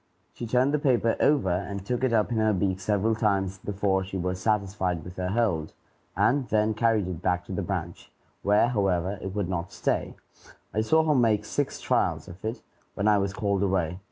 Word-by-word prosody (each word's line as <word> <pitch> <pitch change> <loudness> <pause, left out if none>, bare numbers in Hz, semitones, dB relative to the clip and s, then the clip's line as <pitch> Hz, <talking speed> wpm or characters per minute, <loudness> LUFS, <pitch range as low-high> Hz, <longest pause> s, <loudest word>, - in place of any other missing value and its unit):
She 120 - -6
turned 125 +5 +2
the 150 - +2
paper 125 -5 +2
over 140 -11 +3
and 100 +2 -3
took 125 +3 -2
it 130 - +2
up 110 0 +2
in 115 - 0
her 110 0 +3
beak 95 -1 0
several 105 +3 +1
times 95 -3 0
before 95 -1 0
she 95 0 -5
was 90 0 -2
satisfied 95 -5 0
with 90 0 -10
her 90 0 -2
hold, 95 -8 0 0.4
and 135 0 +2
then 110 0 +2
carried 110 -3 +1
it 90 -2 -5
back 90 -1 0
to - - -9
the 95 - -2
branch, 90 -2 -5 0.3
where, 105 +4 +3
however, 95 -4 0
it 95 0 -5
would 100 -3 -1
not 90 -1 -3
stay. - - -1 0.6
I 110 - +1
saw 160 +9 +3
her 155 -1 +2
make 115 -6 +2
six - - -2
trials - - 0
of 90 +2 -12
it, 110 +3 -4 0.3
when 100 - 0
I 105 -1 +5
was 100 0 -1
called 100 -1 -1
away. 90 -3 0
100 Hz, 205 wpm, -27 LUFS, 95-110 Hz, 0.6 s, I